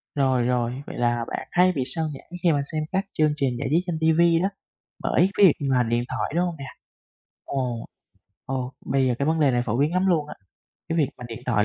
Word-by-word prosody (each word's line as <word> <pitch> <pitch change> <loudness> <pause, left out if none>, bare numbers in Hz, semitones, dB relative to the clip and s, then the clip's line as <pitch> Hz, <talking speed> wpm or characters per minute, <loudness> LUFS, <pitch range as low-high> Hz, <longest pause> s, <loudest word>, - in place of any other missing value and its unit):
Rồi, 130 -3 +2
rồi, 125 +2 -1
vậy - - -7
là 120 -1 +1
bạn - - -5
hay 180 +1 +4
bị 140 -7 -1
xao 160 +5 -2
nhãng 135 - -12
khi 170 - +5
mà 145 - +1
xem 155 -1 -1
các 195 +2 0
chương 155 -1 +3
trình 135 -4 0
giải 140 - -2
trí 160 - +4
trên 175 -3 -2
ti 160 - +4
vi 170 +1 +4
đó 195 - +2 0.5
bởi 175 - +3
cái 205 - +7
việc 165 - +7 0.2
mà 125 -2 +3
điện 120 +1 0
thoại, 130 +2 -3
đúng 175 +1 +2
hông 175 - -3
nè? 140 - -7 0.8
Ồ, 125 -4 -2 0.6
ồ, 130 -1 -3
bây 135 -1 +2
giờ 125 - +2
cái 140 - 0
vấn 160 0 +1
đề 145 - +5
này 120 -1 +1
phổ 115 +1 0
biến 150 +4 +2
lắm 185 +1 +1
luôn 155 -5 +1
á, - - -7 0.5
cái 165 0 0
việc 145 - +3
mà 125 - -8
điện 115 - -7
thoại 105 -4 +2
140 Hz, 245 wpm, -24 LUFS, 125-165 Hz, 0.8 s, cái